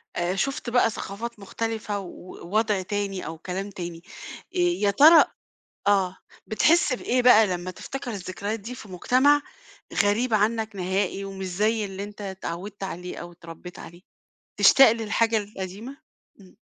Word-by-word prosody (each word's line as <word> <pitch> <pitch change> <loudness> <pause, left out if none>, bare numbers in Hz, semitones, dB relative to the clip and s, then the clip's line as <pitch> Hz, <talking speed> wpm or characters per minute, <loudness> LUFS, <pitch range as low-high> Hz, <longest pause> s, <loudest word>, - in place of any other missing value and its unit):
آآ 175 +2 -1
شُفت 275 +3 -2
بقى 240 -1 +3
ثقافات 225 +2 -6
مختلِفة 215 0 -3
ووضع 195 +3 -2
تاني 200 -1 -3
أو 160 +1 -6
كلام 190 +4 -5
تاني. 175 -3 -7 0.5
آآ - - 0
يا 350 -13 +2
ترى، 315 +10 +8 0.6
آه، 190 -2 +2 0.3
بتحس 300 +5 +3
بإيه 250 0 0
بقى 225 -4 +7
لمّا 180 0 -3
تفتكر 265 +4 -6
الذكريات 200 +2 -4
دي 235 +5 -8
في 220 - -11
مجتمَع 260 +10 +3 0.6
غريب 220 +4 +1
عنك 220 0 +1
نهائي 190 +1 -1
ومش 195 -1 -6
زي 210 +4 0
اللي 195 0 -6
أنت 205 0 -10
اتعوّدت 190 +1 -6
عليه 180 -1 -6
أو 175 0 -8
اتربّيت 170 +1 -11
عليه؟ 170 +2 -12 0.6
تشتاق 270 -4 +8
للحاجة 225 0 +1
القديمة؟ 205 +5 -6 0.4
إمم. 185 +1 -19
205 Hz, 140 wpm, -25 LUFS, 185-230 Hz, 0.6 s, ترى